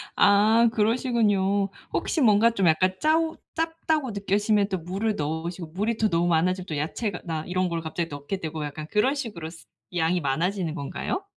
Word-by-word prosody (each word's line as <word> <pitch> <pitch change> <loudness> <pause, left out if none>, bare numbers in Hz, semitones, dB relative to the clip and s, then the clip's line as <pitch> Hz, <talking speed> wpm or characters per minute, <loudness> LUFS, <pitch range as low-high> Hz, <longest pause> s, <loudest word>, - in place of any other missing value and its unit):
아 220 +3 +5
그러시군요. 210 -4 +2 0.2
혹시 320 - 0
뭔가 225 0 +5
좀 195 -5 +1
약간 185 +4 +3
짜오 320 +1 +2 0.2
짭다고 320 -4 -1
느껴지면 205 0 +1
또 190 - -1
물을 195 +6 -2
넣으시고 165 +1 -4
물이 210 +8 -2
너무 175 -6 +2
많아지면 180 +2 +1
또 155 - -3
야채가 180 +6 -3
나 160 -2 -3
이런 185 0 0
걸 170 -1 -2
갑자기 165 +1 -3
넣게 145 +7 -5
되고 160 -3 -4
약간 150 +1 -7
그런 235 +7 +2
식으로 205 - -5
스 165 - -14 0.3
양이 175 +1 +1
많아지는 165 +4 -1
건가요? 170 - -3
190 Hz, 365 characters per minute, -25 LUFS, 165-220 Hz, 0.3 s, 아